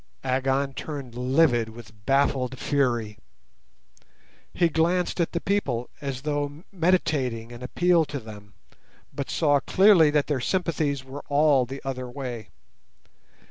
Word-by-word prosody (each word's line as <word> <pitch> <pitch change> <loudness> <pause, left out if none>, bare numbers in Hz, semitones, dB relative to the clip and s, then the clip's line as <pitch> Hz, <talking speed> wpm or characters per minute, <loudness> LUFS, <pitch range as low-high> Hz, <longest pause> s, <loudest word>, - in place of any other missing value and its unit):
Agon 135 +1 0
turned 140 -4 -6
livid 125 -1 +2
with 110 -2 -14
baffled 135 -2 +1
fury. 120 -8 0 1.3
He 170 - +2
glanced 170 +3 +1
at 165 - 0
the 170 - -1
people 145 - -1
as 135 -2 -4
though 145 +1 -3
meditating 150 - 0
an 120 0 -10
appeal 170 +5 +2
to 145 - -5
them, 105 -3 -12 0.6
but 140 - -4
saw 145 -3 +3
clearly 190 -2 +5
that 145 -1 +2
their 145 -4 -1
sympathies 155 -4 -1
were 135 +2 -8
all 145 -3 +3
the 135 +2 -8
other 130 -2 -4
way. 120 -5 -6
140 Hz, 130 wpm, -25 LUFS, 125-155 Hz, 1.3 s, clearly